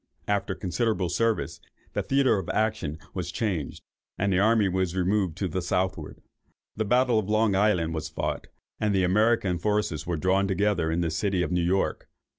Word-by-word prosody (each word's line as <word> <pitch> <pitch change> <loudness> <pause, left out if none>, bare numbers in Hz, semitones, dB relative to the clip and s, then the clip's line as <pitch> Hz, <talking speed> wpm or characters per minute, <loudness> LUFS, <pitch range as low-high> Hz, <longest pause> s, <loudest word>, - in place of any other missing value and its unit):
After 100 -2 0
considerable 95 0 -1
service, 115 +2 0 0.3
the - - 0
theatre 135 -6 +2
of 95 - -6
action 110 -9 -1 0.2
was 90 -2 -4
changed, 95 -10 -3 0.3
and 100 0 +1
the 90 - +3
army 110 0 +4
was 95 -1 -1
removed 95 -2 0
to 95 - -1
the 90 +2 -2
southward. 90 -2 -2 0.5
The 110 - -1
battle 125 +1 +3
of 105 -1 -4
Long 110 -1 +3
Island 95 -5 +2
was 80 -1 -4
fought, - - -3 0.3
and 105 -2 +1
the 95 - +3
American 95 -1 +2
forces 105 -5 -1
were 85 -2 -1
drawn 95 +4 +2
together 100 -3 +1
in 80 +2 0
the 85 -2 -1
city 95 +1 0
of - - -3
New 90 0 +1
York. 90 +3 0
95 Hz, 180 wpm, -26 LUFS, 90-105 Hz, 0.5 s, army